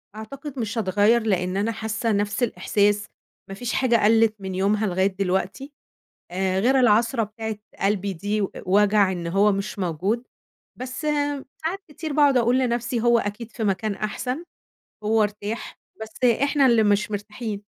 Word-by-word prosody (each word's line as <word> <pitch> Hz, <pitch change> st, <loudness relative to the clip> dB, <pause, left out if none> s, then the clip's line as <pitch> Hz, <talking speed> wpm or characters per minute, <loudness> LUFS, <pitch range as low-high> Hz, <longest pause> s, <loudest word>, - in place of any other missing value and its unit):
أعتقد 275 Hz, +6 st, -8 dB
مش 225 Hz, 0 st, -3 dB
هاتغيّر، 210 Hz, +3 st, +3 dB
لأن 185 Hz, -3 st, 0 dB
أنا 210 Hz, +3 st, 0 dB
حاسة 220 Hz, +1 st, -2 dB
نَفس 205 Hz, +3 st, 0 dB
الإحساس، 205 Hz, 0 st, +1 dB, 0.4 s
ما 195 Hz, -, -6 dB
فيش 245 Hz, +3 st, -4 dB
حاجة 255 Hz, -3 st, +2 dB
قَلّت 225 Hz, 0 st, +4 dB
من 190 Hz, -1 st, -5 dB
يومها 205 Hz, +3 st, +1 dB
لغاية 190 Hz, +1 st, +2 dB
دلوقتي، 190 Hz, +7 st, -2 dB, 0.6 s
آآ، 190 Hz, +1 st, 0 dB
غير 260 Hz, +6 st, +3 dB
العصرة 230 Hz, 0 st, +3 dB
بتاعة 220 Hz, +1 st, -5 dB, 0.2 s
قلبي 200 Hz, 0 st, 0 dB
دي 205 Hz, +4 st, -2 dB
و 195 Hz, -, -1 dB, 0.2 s
وجع 200 Hz, +1 st, +4 dB
إن 175 Hz, -2 st, -4 dB
هو 200 Hz, +4 st, +3 dB
مش 200 Hz, +1 st, -3 dB
موجود، 190 Hz, +7 st, -1 dB, 0.6 s
بس 255 Hz, +4 st, -5 dB
آآ 290 Hz, -2 st, -1 dB, 0.2 s
ساعات 375 Hz, +5 st, -2 dB
كتير 310 Hz, 0 st, -6 dB
باقعد 285 Hz, -3 st, +4 dB
أقول 245 Hz, +2 st, +3 dB
لنَفسي 245 Hz, -1 st, -1 dB
هو 235 Hz, 0 st, +4 dB
أكيد 215 Hz, +2 st, -5 dB
في 225 Hz, -, -5 dB
مكان 200 Hz, +1 st, 0 dB
أحسن، 250 Hz, -, -3 dB, 0.6 s
هو 220 Hz, 0 st, +3 dB
ارتاح 210 Hz, +2 st, -4 dB, 0.2 s
بس 220 Hz, +3 st, -6 dB, 0.2 s
إحنا 280 Hz, -1 st, +3 dB
اللي 235 Hz, -3 st, +5 dB
مش 210 Hz, +1 st, +2 dB
مرتاحين. 210 Hz, 0 st, -5 dB
215 Hz, 160 wpm, -24 LUFS, 200-240 Hz, 0.6 s, اللي